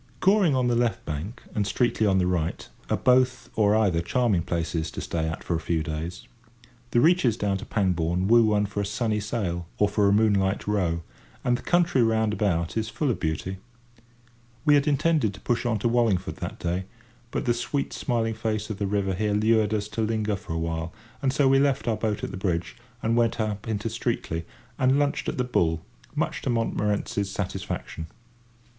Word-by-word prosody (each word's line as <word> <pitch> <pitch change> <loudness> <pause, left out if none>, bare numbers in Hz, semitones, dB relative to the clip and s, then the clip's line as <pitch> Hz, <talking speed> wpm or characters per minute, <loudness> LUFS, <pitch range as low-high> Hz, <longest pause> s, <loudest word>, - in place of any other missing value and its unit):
Goring 190 -6 +4
on 130 -1 +2
the 120 - +2
left 120 -1 0
bank 80 - -5
and 105 - +1
Streatley 110 0 +1
on 95 - +3
the 90 - +2
right 85 -3 -1 0.2
are - - +2
both 125 0 +2
or 105 -1 +4
either 100 -7 +2
charming 105 0 +1
places 85 -1 -2
to - - -7
stay 80 -1 -2
at 80 - -5
for - - -2
a - - 0
few 80 -1 -1
days. 80 +4 -5 0.6
The 120 - +3
reaches 135 -6 +4
down 100 -2 0
to - - -8
Pangbourne 90 -2 +1
woo 115 +1 +6
one 105 -1 +2
for 100 0 -3
a - - -1
sunny 110 0 0
sail 95 -6 -3
or 105 - +4
for 100 0 +2
a - - +3
moonlight 100 -2 +2
row, 90 -5 0 0.4
and 125 - +2
the - - -5
country 175 -6 +2
round 110 -2 +2
about 85 -6 0
is 110 -1 -1
full 145 -4 0
of - - -3
beauty. 80 +4 -2 1.1
We 150 - +6
had 145 0 +4
intended 145 -7 +2
to - - -12
push 120 0 0
on 115 -2 +1
to 105 - 0
Wallingford 115 -6 +1
that - - -5
day, 90 +2 -2 0.4
but 140 - -3
the 120 - +3
sweet 120 +4 -2
smiling 115 -3 0
face 110 -1 -2
of 100 - -5
the 100 - 0
river 95 -1 0
here 105 +2 0
lured 110 0 +3
us 105 -1 -1
to 105 +2 -3
linger 110 -1 0
for 95 - -7
a - - -2
while; 80 0 -2 0.3
and 135 -2 +2
so 140 0 +3
we 135 0 +5
left 135 -5 +1
our 115 - +2
boat 105 -1 -2
at - - -3
the 95 - -6
bridge, 90 -3 -2 0.3
and 115 +1 +2
went 115 -1 +2
up 105 -1 -2
into 110 0 -2
Streatley, 110 -7 -2 0.3
and 130 +1 +4
lunched 145 -1 0
at - - -4
the 125 - +1
"Bull," 85 -9 0 0.3
much 155 - -1
to - - -2
Montmorency's 105 -3 0
satisfaction. 90 -4 -4
105 Hz, 200 wpm, -26 LUFS, 95-120 Hz, 1.1 s, woo